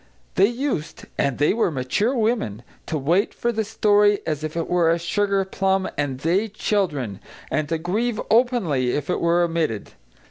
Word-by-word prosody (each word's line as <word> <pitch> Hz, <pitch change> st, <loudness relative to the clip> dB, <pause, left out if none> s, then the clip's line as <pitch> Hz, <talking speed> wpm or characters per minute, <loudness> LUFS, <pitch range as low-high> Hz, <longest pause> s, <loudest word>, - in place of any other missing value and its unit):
They 195 Hz, -, +5 dB
used 240 Hz, -, -3 dB
and 140 Hz, -3 st, 0 dB
they 145 Hz, -, +3 dB
were 225 Hz, -3 st, +1 dB
mature 165 Hz, -, 0 dB
women 215 Hz, -, 0 dB, 0.2 s
to 160 Hz, -, -1 dB
wait 170 Hz, +9 st, +1 dB
for 240 Hz, -, 0 dB
the 220 Hz, -1 st, -1 dB
story 205 Hz, -1 st, +3 dB
as 155 Hz, -1 st, -2 dB
if 155 Hz, +1 st, -4 dB
it 165 Hz, -, -1 dB
were 175 Hz, -2 st, +3 dB
a 165 Hz, -, +3 dB
sugarplum 195 Hz, +1 st, 0 dB
and 140 Hz, -3 st, -2 dB
they, 185 Hz, +8 st, +1 dB
children; 170 Hz, -, -1 dB, 0.3 s
and 155 Hz, -1 st, -1 dB
to 165 Hz, -, 0 dB
grieve 215 Hz, +8 st, -1 dB
openly 215 Hz, -, +2 dB
if 145 Hz, +4 st, -2 dB
it -, -, -1 dB
were 170 Hz, +1 st, +3 dB
omitted. 165 Hz, -11 st, -1 dB
175 Hz, 170 wpm, -23 LUFS, 150-210 Hz, 0.3 s, They